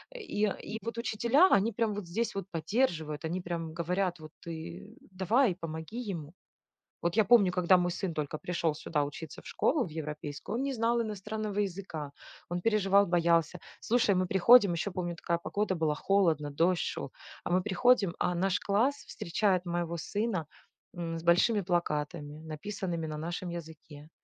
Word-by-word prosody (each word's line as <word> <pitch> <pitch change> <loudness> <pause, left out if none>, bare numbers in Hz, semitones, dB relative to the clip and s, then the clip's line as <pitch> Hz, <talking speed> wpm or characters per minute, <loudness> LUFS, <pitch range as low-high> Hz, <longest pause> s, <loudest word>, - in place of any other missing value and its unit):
И 420 - -3
и 215 +1 -2
вот 230 0 -5
учителя, 235 - +3
они 205 +3 +4
прямо 225 -1 0
вот 200 -3 -5
здесь 225 +6 -2
вот 195 - -3
поддерживают, 165 - -1
они 175 +3 -2
прямо 170 -2 -4
говорят: 180 +1 -1
"Вот 155 -1 -11 0.2
ты 165 +4 -7 0.2
давай, 190 +4 +2
помоги 165 +5 -6
ему". 160 -3 -6 0.7
Вот 170 +3 0
я 220 - +5
помню, 205 -3 +6
когда 180 0 +5
мой 175 0 +1
сын 180 0 -3
только 155 0 -3
пришел 170 -2 -1
сюда 150 0 -1
учиться 145 +2 -8
в - - -21
школу, 280 -3 +1
в - - -6
европейскую, 150 +4 -5
он - - -1
не 275 - -1
знал 235 0 +1
иностранного 215 0 -4
языка. 180 -7 -4 0.4
Он 175 +1 -2
переживал, 200 -1 +3
боялся. 170 -1 +2 0.2
Слушай, 230 -3 +2
мы 185 0 +1
приходим, 200 +2 +6
еще 170 +4 -2
помню 175 -1 -3
такая 170 0 -1
погода 200 +3 -1
была: 160 -3 +1
холодно, 165 -7 +2
дождь 170 +5 +2
шел. - - -4 0.3
А - - -3
мы 180 +1 +3
приходим, 200 -1 +3
а 180 - +1
наш 190 +2 +1
класс 225 +8 +2
встречает 185 +1 0
моего 170 -1 -2
сына, 200 -1 -2 0.5
м, 165 -1 -3
с - - -8
большими 180 +6 +4
плакатами, 150 -3 -2
написанными 170 +1 -4
на 155 -1 -5
нашем 175 +3 -4
языке. 155 -3 -9
180 Hz, 170 wpm, -30 LUFS, 165-205 Hz, 0.7 s, помню